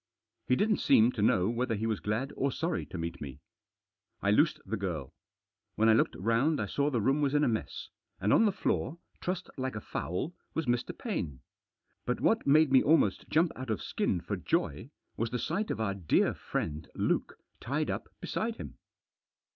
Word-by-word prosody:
He 125 - +4
didn't 210 +7 +2
seem 115 +3 +5
to 115 - -4
know 95 -3 +3
whether 120 0 0
he 110 +2 -2
was 110 -3 0
glad 115 +7 -2
or 140 0 0
sorry 165 +5 -2
to - - -7
meet 85 +1 -4
me. 70 -1 -7 0.8
I 100 - +1
loosed 155 +7 +3
the 115 - -2
girl. 85 - -4 0.6
When 110 +1 +4
I - - +7
looked 110 - +2
round 115 - +2
I 105 - 0
saw 140 +8 0
the 125 -5 0
room 135 +7 +2
was 145 0 +1
in 145 - +4
a - - +4
mess, 110 -2 -3 0.3
and 105 - +2
on 225 - +6
the 210 - +4
floor, 170 -4 -1 0.2
trussed 180 0 -3
like 130 -2 -2
a - - -2
fowl, 100 - -3 0.2
was 160 - 0
Mr. 120 -1 -1
Paine. 85 - -3 0.6
But - - -1
what - - +2
made 155 0 +5
me 130 - +7
almost 160 +3 +2
jump 160 +2 +3
out 130 -1 -7
of 110 - 0
skin - - -1
for - - -3
joy, - - -1 0.3
was 115 0 0
the 125 - -2
sight 175 - -2
of - - -2
our 105 -3 0
dear 90 -6 +2
friend 75 -1 -4
Luke - - 0 0.2
tied - - -1
up - - -4
beside 225 +1 -2
him. - - -9
120 Hz, 195 wpm, -30 LUFS, 105-150 Hz, 0.8 s, I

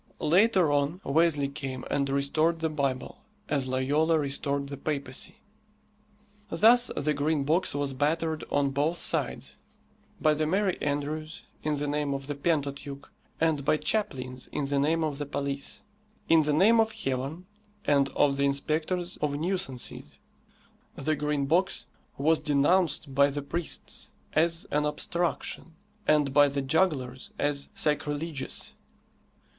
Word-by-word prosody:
Later 185 -1 +4
on 145 +4 +1
Wesley 150 -1 +2
came 135 -2 -5
and 140 -1 +1
restored 145 +4 +1
the 160 -1 -1
Bible, 140 -4 -2 0.3
as 140 -3 0
Loyola 145 +5 +2
restored 140 -1 -1
the 140 0 -6
papacy. 140 -2 -3 1.1
Thus 240 +4 +5
the 150 +1 +1
Green 145 0 0
Box 165 +3 +1
was 145 -1 -1
battered 155 +3 0
on 140 -1 +1
both 150 +5 0
sides; - - -2 0.6
by 155 - +4
the 155 0 0
merry 190 +2 +1
andrews, 150 +2 -3 0.2
in 150 -1 0
the 145 0 -2
name 145 -1 -1
of 135 0 -5
the 145 - -3
Pentateuch, 140 -2 -2 0.3
and 155 -3 +1
by 155 - +3
chaplains 130 -12 -2
in 145 - -1
the 140 0 0
name 160 +3 +2
of 150 -2 -2
the 145 - -2
police. 140 -1 -3 0.4
In 165 -1 +6
the 150 -1 +1
name 210 +9 +5
of 225 0 +3
Heaven 135 +7 -3 0.4
and 140 -1 +3
of 140 -1 +3
the 140 - +1
inspectors 155 +5 -1
of 145 -1 -1
nuisances. 165 -6 -3 0.8
The 155 +3 0
Green 150 -1 -1
Box 175 +7 +1 0.3
was 155 +3 +3
denounced 150 0 +2
by 140 +1 +5
the 145 0 -4
priests 170 +3 -4 0.2
as 165 +1 +2
an 150 0 +1
obstruction, 165 +1 -2 0.3
and 150 -3 +3
by 145 0 +7
the 140 0 -2
jugglers 135 -4 0
as 145 -1 -1
sacrilegious. 150 -1 -2
145 Hz, 140 wpm, -28 LUFS, 140-160 Hz, 1.1 s, by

